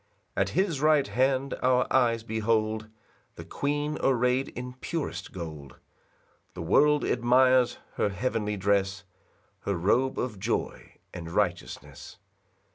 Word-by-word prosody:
2 - - +1
At - - +1
his 180 -7 +1
right 155 -2 +4
hand 130 +1 +1
our 125 0 +3
eyes 115 -3 +3
behold 110 0 -1 0.5
The - - -9
queen 145 +1 -2
array'd 125 0 +2
in 125 0 -5
purest 165 -4 -4
gold; 75 -6 -8 0.8
The - - -5
world 145 - +4
admires 125 +1 +3 0.2
her - - +2
heavenly 105 -1 -2
dress, 100 0 0 0.6
Her 100 - -2
robe 120 +10 +1
of 115 -6 -3
joy 110 +4 -3 0.2
and 85 -1 -7
righteousness. 90 -1 -3
120 Hz, 120 wpm, -27 LUFS, 100-130 Hz, 0.8 s, right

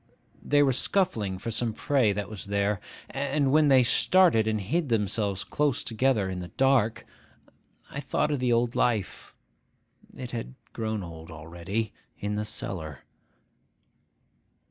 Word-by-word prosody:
They 145 0 +3
were 135 -2 +3
scuffling 115 - +1
for 115 +5 -5
some 115 0 0
prey 130 -2 +2
that 100 -1 -3
was 105 -2 -7
there; 100 0 0 0.3
and, 140 0 0
when 155 +1 +5
they 135 -2 +6
started 160 -3 +4
and 110 -1 0
hid 145 - -1
themselves 105 -3 0
close 145 -4 0
together 115 -3 +1
in 95 -1 -4
the 90 - -6
dark, 130 -1 +1 0.9
I 140 - -5
thought 150 +1 0
of 145 - 0
the 125 -1 +1
old 120 0 +1
life 110 -6 -1 0.8
(it 125 -2 -6
had 115 - -5 0.2
grown 110 -2 -3
old 80 -1 -10
already) 85 +7 -4 0.2
in 105 0 -3
the 105 0 -2
cellar. 80 -9 -3
110 Hz, 145 wpm, -27 LUFS, 100-135 Hz, 0.9 s, they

